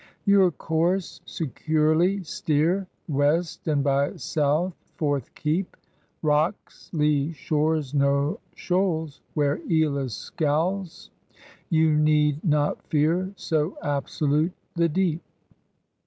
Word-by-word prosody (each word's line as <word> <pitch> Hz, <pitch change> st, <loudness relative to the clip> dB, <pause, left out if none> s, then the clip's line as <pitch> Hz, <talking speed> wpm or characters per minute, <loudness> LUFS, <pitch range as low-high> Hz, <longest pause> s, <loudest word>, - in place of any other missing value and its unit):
Your 200 Hz, -3 st, +5 dB
course 170 Hz, +3 st, -1 dB
securely 160 Hz, +5 st, +1 dB
steer. 165 Hz, +4 st, 0 dB, 0.2 s
West 150 Hz, +4 st, 0 dB
and 145 Hz, -3 st, +2 dB
by 140 Hz, 0 st, +1 dB
South 155 Hz, +5 st, 0 dB, 0.2 s
forth 145 Hz, -5 st, -1 dB
keep; 165 Hz, +5 st, -2 dB, 0.5 s
Bocks, 155 Hz, +5 st, -1 dB
lee 150 Hz, -1 st, +1 dB
shores 155 Hz, -1 st, 0 dB
nor 140 Hz, +6 st, +1 dB, 0.2 s
shoals. 175 Hz, -5 st, -1 dB
Where 145 Hz, -1 st, +1 dB
Eolus 140 Hz, -, +1 dB
scowls. 170 Hz, +4 st, -2 dB, 0.6 s
You 160 Hz, -3 st, +3 dB
need 150 Hz, 0 st, +2 dB
not 150 Hz, -3 st, +1 dB
fear, 165 Hz, +5 st, +1 dB
So 160 Hz, -1 st, -1 dB
absolute 145 Hz, +3 st, 0 dB, 0.2 s
the 170 Hz, -1 st, +2 dB
deep. 170 Hz, 0 st, 0 dB
155 Hz, 95 wpm, -25 LUFS, 145-175 Hz, 0.6 s, Your